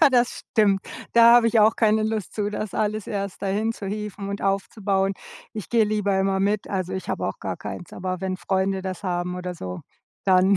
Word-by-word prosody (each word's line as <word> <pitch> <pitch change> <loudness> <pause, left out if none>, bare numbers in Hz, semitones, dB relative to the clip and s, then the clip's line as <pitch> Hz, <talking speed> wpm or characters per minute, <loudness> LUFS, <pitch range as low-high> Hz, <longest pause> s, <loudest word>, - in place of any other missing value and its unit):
Ja, 290 - +8
das 245 -1 +1
stimmt. 205 -4 +4 0.3
Da 235 0 +8
habe 240 -1 +6
ich 225 -1 +4
auch 220 +2 +5
keine 220 -1 +3
Lust 215 -2 -2
zu, 205 -1 -1
das 210 -1 -4
alles 215 -1 -1
erst 200 -2 -4
dahin 210 +3 0
zu 200 - -7
hieven 205 -1 -4
und 200 0 -4
aufzubauen. 195 0 0 0.4
Ich 215 -3 -6
gehe 230 -2 +4
lieber 205 -2 +1
immer 190 0 +1
mit, 205 +1 0
also 185 -2 -2
ich 190 0 -4
habe - - -1
auch - - -4
gar - - -4
keins, 175 - -7
aber 185 0 -3
wenn 190 -1 -2
Freunde 190 0 0
das 185 -1 -5
haben 180 -1 -2
oder 180 0 -4
so, 90 - -6 0.4
dann 190 +1 +5
200 Hz, 210 wpm, -24 LUFS, 190-215 Hz, 0.4 s, Ja